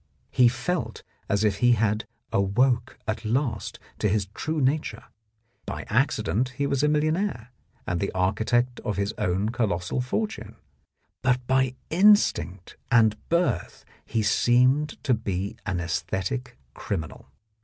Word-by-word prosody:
He 125 - +5
felt 120 -1 -2 0.3
as 100 +1 +1
if 105 -2 +2
he 120 +2 +4
had 110 -1 0 0.3
awoke 120 +5 +1
at 110 +1 -2
last 115 -1 -1 0.2
to 105 - +2
his 100 -1 +1
true 155 +1 -2
nature; 145 +3 0 0.6
by - - -5
accident 120 +10 +1
he 140 - 0
was 140 -1 0
a 150 - +3
millionaire 155 - 0 0.4
and 90 - -1
the 100 - -1
architect 120 +7 +1
of 105 - -3
his 100 +2 -1
own 95 +4 0
colossal 110 -2 -1
fortune, 125 - -3 0.7
but 125 -1 +1
by 130 0 +2 0.2
instinct 175 - +3
and 110 -3 +5
birth 170 - 0 0.2
he 110 -1 -1
seemed 125 +7 +3
to 130 - +2
be 100 -1 -2
an 95 -3 -1
aesthetic 95 +9 -3 0.2
criminal. 85 -7 -5
115 Hz, 135 wpm, -26 LUFS, 100-130 Hz, 0.7 s, He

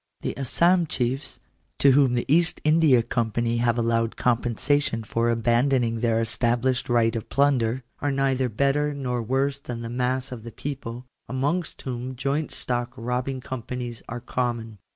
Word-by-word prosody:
The - - -3
Assam 170 +6 +2
chiefs, 130 +1 -2 0.4
to 140 - +5
whom 130 -2 +4
the 120 - 0
East 170 +4 +3
India 155 -6 +5
Company 115 0 0
have 120 0 +2
allowed 115 -1 +1
compensation 120 +1 +1
for 115 +2 0
abandoning 120 +1 +2
their 115 -1 +2
established 120 +3 0
right 115 -1 +3
of 115 - -5
plunder, 130 -2 +2 0.2
are 145 - 0
neither 135 -2 +1
better 140 +5 +1
nor 125 -3 -2
worse 135 +4 0
than 120 -4 -6
the 115 - -5
mass 125 +2 -1
of 125 -3 -6
the 115 +1 -9
people, 125 -3 -6 0.2
amongst 145 +6 -2
whom 130 0 -4
joint 140 +4 -1
stock 120 0 -2
robbing 125 +2 -2
companies 125 -1 -5
are 120 +1 -5
common. 120 -3 -3
125 Hz, 150 wpm, -25 LUFS, 115-135 Hz, 0.4 s, to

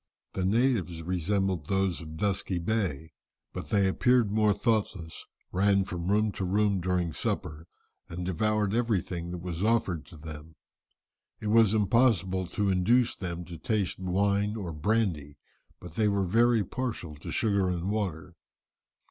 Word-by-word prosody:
The 95 - -2
natives 100 - +1
resembled 90 -1 -1
those 95 -3 0
of 80 -1 -9
Dusky 95 -1 -1
Bay, 85 -5 -2 0.4
but - - -6
they 100 -2 +3
appeared 120 +2 +3
more 105 0 +3
thoughtless, 100 -7 -1 0.2
ran 100 +1 +3
from 90 -2 -5
room 105 +1 +2
to 100 - -5
room 100 +1 +1
during 90 -2 0
supper, 80 +3 -3 0.4
and 90 +1 -5
devoured 105 +3 0
everything 95 -7 -1
that 90 -1 -6
was 90 0 -4
offered 105 -7 +1
to 85 - -13
them. 80 0 -10 0.8
It 105 - -3
was 110 -1 +5
impossible 100 -4 +2
to 100 +2 0
induce 115 +7 +3
them 85 -2 -5
to 85 -2 -9
taste 100 -1 -1
wine 100 +3 +1
or 95 -7 -5
brandy, 80 -5 -1 0.4
but 90 -3 -10
they 105 +4 +2
were 100 -1 +1
very 115 +3 +3
partial 110 -7 -4
to 70 - -7
sugar 100 -5 +1
and 90 +2 -2
water. 95 -5 -3
95 Hz, 150 wpm, -28 LUFS, 85-105 Hz, 0.8 s, was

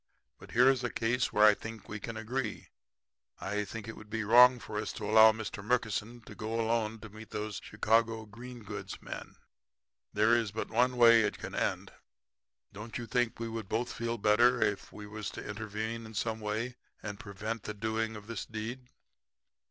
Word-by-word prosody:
But - - -13
here 125 +2 +6
is 130 -2 +3
a 125 - 0
case 125 +3 0
where 105 +1 +5
I 105 - +8
think 110 0 -8
we 105 - -5
can 115 +2 -6
agree. 115 0 -3 0.7
I 105 +1 -2
feel 115 +3 -7
that 115 - -9
it 115 - -6
would 110 - -13
be 110 0 -2
wrong 125 +4 +8
for 105 -2 -5
us 105 - -3
to - - -6
allow 110 +1 +8
Mr. 110 -2 -6
Murkison 115 0 -1
to - - -12
go 110 0 -3
alone 115 -1 0
to 110 - -9
meet 110 +1 -11
those 105 -1 -4
Chicago 110 +1 +1
green 120 +2 -10
goods 100 -2 -6
men. - - -8 0.8
There 110 +3 +4
is 115 -4 0
but 110 +1 -4
one 125 +2 +2
way 115 -1 +8
it 105 - 0
can - - -7
end. - - -1 0.8
Don't 105 +3 -6
you 120 - -5
think 120 -1 0
we 115 - -3
would 115 -3 -5
both 115 +2 -1
feel 115 0 -2
better 120 +4 +4
if 100 - 0
we 105 - -9
was 105 -1 -5
to - - -7
intervene 110 +2 -4
in 110 - -12
some 110 +1 -1
way 110 +4 -3 0.3
and 105 -2 -5
prevent 110 +2 -5
the 105 - -4
doing 110 +1 -2
of 105 -1 -9
this 115 -2 -5
deed?' 120 +3 -6
110 Hz, 200 wpm, -31 LUFS, 105-115 Hz, 0.8 s, I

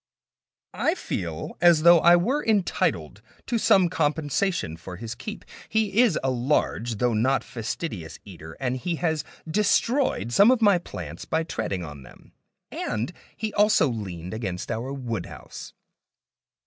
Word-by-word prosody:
I - - +1
feel 85 -3 -5
as 170 -3 +5
though 170 0 +8
I 170 +2 +7
were 245 +12 +1
entitled 105 - 0 0.2
to 235 -1 -1
some 190 -4 +5
compensation 160 - -1
for 90 +2 -9
his 115 +4 -6
keep. 210 - -8 0.2
He 220 0 +2
is 230 -10 +3
a 135 - +1
large 120 -2 0
though 120 +3 +1
not 120 +3 +2
fastidious 110 - -5
eater, 80 -4 -11
and 130 -1 -1
he 170 +6 -2
has 160 -3 -1 0.2
destroyed 210 - +1
some 200 - +7
of 255 -2 +4
my 205 -5 +4
plants - - -8
by 160 0 0
treading 100 - -3
on 75 -2 -9
them; 65 - -16 0.4
and 115 +10 -3 0.2
he 215 -1 -3
also 205 -8 +4
leaned 95 -6 -5
against 95 -5 -4
our 120 +4 -3
woodhouse. 115 -9 -6
135 Hz, 145 wpm, -25 LUFS, -, 0.4 s, though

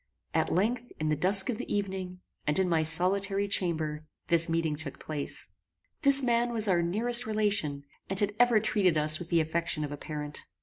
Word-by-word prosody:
At - - 0
length, 235 +6 -1
in 155 0 -2
the 155 - +1
dusk 190 +5 +4
of 220 - -6
the - - -6
evening, 190 -3 -4 0.3
and 150 - +1
in 190 -1 +1
my 165 -2 +1
solitary 195 +5 +2
chamber, 160 -6 -2 0.3
this 165 0 +4
meeting 165 -2 -1
took 150 -2 -4
place. 150 -2 -3 0.5
This 280 -2 +6
man 240 -1 +1
was 225 -2 +2
our 180 -3 +2
nearest 230 +7 +1
relation, 205 -10 -1 0.3
and 195 0 +2
had 205 0 0
ever 245 -3 +4
treated 195 -6 +1
us 155 0 +2
with 175 - -9
the 170 -1 +2
affection 160 -1 -2
of 145 - -5
a 145 - -6
parent. 150 0 -5
180 Hz, 190 wpm, -28 LUFS, 155-210 Hz, 0.5 s, This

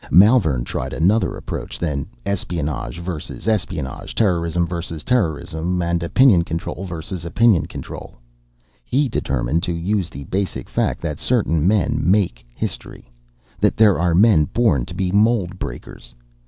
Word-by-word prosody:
"Malvern 90 - +5
tried - - -4
another 100 +8 +2
approach - - -6
than 75 -5 -2 0.2
espionage 85 -7 -3
versus 85 +3 -6
espionage, 90 -10 -2
terrorism 85 -4 +1
versus 85 -2 -5
terrorism 90 -5 0
and 85 0 0
opinion 95 +1 +4
control 85 +3 -4
versus 85 0 -6
opinion 95 +1 +3
control. - - -8 0.7
He 140 - +1
determined 70 - -1
to 85 - -1
use 90 +2 -1
the 70 - -8
basic 95 +6 -3
fact - - 0
that - - -4
certain 80 +2 +1
men 100 -3 +2
make 90 - +1
history: - - -6 0.5
that - - +2
there 105 -5 +5
are 85 -1 +2
men 95 -5 +5
born 75 - +1
to 85 - -9
be 95 -1 -1
mould 100 -3 +2
breakers. - - -8
85 Hz, 140 wpm, -21 LUFS, 80-100 Hz, 0.7 s, Malvern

